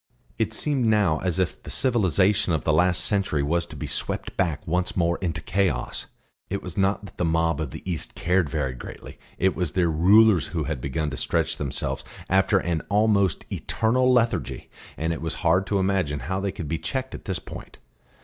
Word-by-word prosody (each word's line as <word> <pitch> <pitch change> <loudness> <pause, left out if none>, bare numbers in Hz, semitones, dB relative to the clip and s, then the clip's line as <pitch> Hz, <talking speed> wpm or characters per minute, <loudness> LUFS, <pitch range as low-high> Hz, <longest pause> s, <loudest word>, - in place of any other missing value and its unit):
It - - +1
seemed 140 -5 0
now 105 -8 +3
as 90 -2 -1
if 95 -3 -1
the - - -10
civilisation 105 - +2
of 80 - 0
the 80 - +2
last 90 +3 +3
century 95 -8 +1
was 85 +4 0
to 80 - -10
be 70 - -5
swept - - -3
back 85 -6 -1
once 90 +3 -1
more 85 -1 +1
into 85 -4 -2
chaos. 95 +4 -1 0.4
It 100 - -3
was 90 -3 -6
not 100 +1 +1
that 95 - -13
the - - +1
mob 80 -2 +1
of 75 - -3
the - - -9
East 85 -4 -3
cared 90 -2 +1
very 70 -4 -1
greatly; - - -10 0.2
it 95 +1 +2
was 90 -5 -2
their 90 -2 +2
rulers 95 +2 +5
who - - -2
had 65 - -3
begun 75 +3 -2
to - - -5
stretch - - 0
themselves 70 -3 -3 0.3
after 95 +1 +4
an 85 -3 -1
almost 100 -3 +2
eternal 125 +3 +1
lethargy, 115 - 0 0.3
and 80 +2 -1
it 80 - -6
was 80 -1 -2
hard 90 +4 +3
to 100 - +1
imagine 95 -7 0
how 95 +1 -2
they 100 0 -1
could 85 -6 -6
be 80 +2 -2
checked 130 -1 -3
at - - -8
this 95 -3 -2
point. - - -10
90 Hz, 200 wpm, -25 LUFS, 80-100 Hz, 0.4 s, rulers